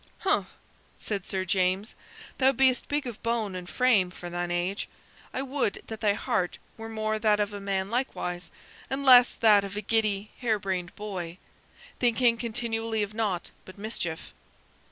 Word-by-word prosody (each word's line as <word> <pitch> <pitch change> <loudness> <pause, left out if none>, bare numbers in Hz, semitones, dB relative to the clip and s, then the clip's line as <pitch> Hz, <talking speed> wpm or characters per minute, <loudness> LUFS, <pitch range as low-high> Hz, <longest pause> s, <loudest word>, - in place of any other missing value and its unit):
"Humph!" 390 +1 +2 0.5
said 200 -4 -4
Sir 190 -1 -1
James; 190 +2 +1 0.5
"thou 265 0 +5
be'st 260 0 +3
big 290 -1 0
of 240 -4 -6
bone 230 -4 -1
and 180 -1 -6
frame 230 -8 +3
for 175 -1 -8
thine 175 0 -2
age. 175 +3 -1 0.4
I 265 - -2
would 270 -6 -1
that 220 -1 -7
thy 210 -2 +3
heart 180 -3 -1 0.2
were 225 0 -8
more 215 -1 -1
that 210 -1 +3
of 205 0 0
a 205 - -6
man 195 0 -1
likewise, 180 -8 -2 0.4
and 275 +1 -2
less 250 -2 +8
that 210 -3 +5
of 200 +1 -6
a - - -1
giddy, 215 -1 0
hare 230 -3 +1
brained 185 -3 -3
boy, 185 -5 -5 0.6
thinking 240 -1 +3
continually 225 -1 -1
of 205 +1 -5
naught 210 -5 -1
but 185 - -13
mischief." 200 -6 -4
210 Hz, 165 wpm, -28 LUFS, 190-230 Hz, 0.6 s, less